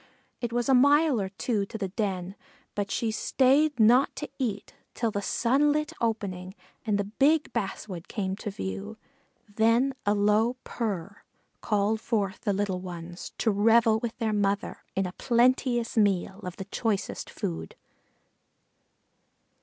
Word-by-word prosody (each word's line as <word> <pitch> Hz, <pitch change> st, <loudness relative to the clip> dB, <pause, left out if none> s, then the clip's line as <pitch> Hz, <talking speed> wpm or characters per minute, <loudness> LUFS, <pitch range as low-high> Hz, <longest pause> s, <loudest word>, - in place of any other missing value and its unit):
It 240 Hz, -2 st, -3 dB
was 240 Hz, 0 st, 0 dB
a 270 Hz, -, +4 dB
mile 285 Hz, -1 st, +5 dB
or 190 Hz, -, -3 dB
two 205 Hz, +2 st, -1 dB
to 220 Hz, -, -6 dB
the 195 Hz, -3 st, -3 dB
den, 190 Hz, -2 st, -2 dB, 0.4 s
but 205 Hz, -1 st, -2 dB
she 225 Hz, +2 st, -1 dB
stayed 275 Hz, +5 st, +2 dB
not 240 Hz, +5 st, +5 dB
to 295 Hz, -, -5 dB
eat 215 Hz, -6 st, -3 dB, 0.2 s
till 230 Hz, -2 st, 0 dB
the 200 Hz, -, -2 dB
sunlit 290 Hz, +8 st, +1 dB
opening 195 Hz, -5 st, -2 dB, 0.3 s
and 210 Hz, -2 st, +2 dB
the 205 Hz, -, 0 dB
big 280 Hz, +9 st, +2 dB
basswood 195 Hz, -5 st, -4 dB
came 190 Hz, -3 st, -2 dB
to 210 Hz, -, -5 dB
view; 95 Hz, -, -5 dB, 0.5 s
then 230 Hz, +6 st, +2 dB
a 205 Hz, +1 st, +2 dB
low 210 Hz, +4 st, +3 dB
"prr -, -, -14 dB
prr" 200 Hz, -4 st, -2 dB, 0.5 s
called 210 Hz, +1 st, +1 dB
forth 200 Hz, -5 st, -1 dB
the 205 Hz, -, 0 dB
little 195 Hz, -2 st, -1 dB
ones 175 Hz, -1 st, -8 dB
to 225 Hz, -, +2 dB
revel 220 Hz, +2 st, +4 dB
with 235 Hz, 0 st, -4 dB
their 225 Hz, -3 st, -1 dB
mother 200 Hz, -1 st, -1 dB
in 195 Hz, -, +1 dB
a 180 Hz, -, -4 dB
plenteous 240 Hz, 0 st, +2 dB
meal 195 Hz, -2 st, +1 dB
of 180 Hz, -2 st, -6 dB
the 195 Hz, -, -7 dB
choicest 200 Hz, 0 st, -2 dB
food. 80 Hz, -1 st, -5 dB
215 Hz, 150 wpm, -27 LUFS, 195-240 Hz, 0.5 s, mile